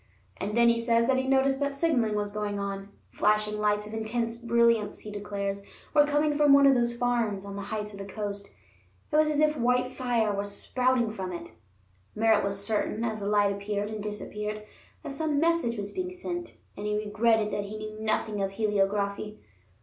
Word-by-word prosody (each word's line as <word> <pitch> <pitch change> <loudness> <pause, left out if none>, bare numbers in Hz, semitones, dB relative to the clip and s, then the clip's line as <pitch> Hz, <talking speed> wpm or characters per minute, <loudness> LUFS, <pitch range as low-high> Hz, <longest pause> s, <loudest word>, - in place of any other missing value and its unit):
And 210 +3 -3
then 235 0 +6
he 235 0 +4
says 230 0 +2
that 260 +1 +2
he 260 0 -1
noticed 270 0 +3
that 280 -1 0
signaling 260 -9 +1
was 205 -1 -1
going 210 -1 -3
on. 200 0 -4 0.2
Flashing 210 0 +1
lights 210 0 +1
of 210 - -9
intense 230 +1 -2
brilliance, 235 -2 +2
he 215 - -8
declares, 200 -1 -3 0.3
were 295 -1 +5
coming 295 +1 +2
from 290 -1 +5
one 280 0 +7
of 275 - +7
those 240 -1 +1
farms 235 -5 0
on 200 0 -7
the 200 - -4
heights 210 +1 -4
of 200 - -9
the 195 - -5
coast; 205 -1 -5 0.6
it - - 0
was 305 0 +5
as 300 -1 0
if 305 0 +3
white 250 0 +1
fire 240 -5 0
was 200 0 -3
spouting 250 -3 +1
from 190 -4 -5
it. 170 -1 -7 0.6
Merritt 220 0 +3
was 200 0 -1
certain, 215 +1 -1
as 220 -2 -2
the 200 - -4
light 205 -1 +3
appeared 205 +1 -3
and 215 -1 -5
disappeared, 210 0 -5 0.4
that - - -5
some 300 0 0
message 330 -8 +1
was 200 -1 -5
being 365 -1 -3
sent, 350 -1 -5 0.2
and 205 +1 -5
he 210 0 0
regretted 215 +1 +2
that 205 - -1
he 210 +2 -6
knew 215 0 -7
nothing 215 -1 -1
of 195 0 -1
heliography. 205 0 0
215 Hz, 200 wpm, -28 LUFS, 205-250 Hz, 0.6 s, one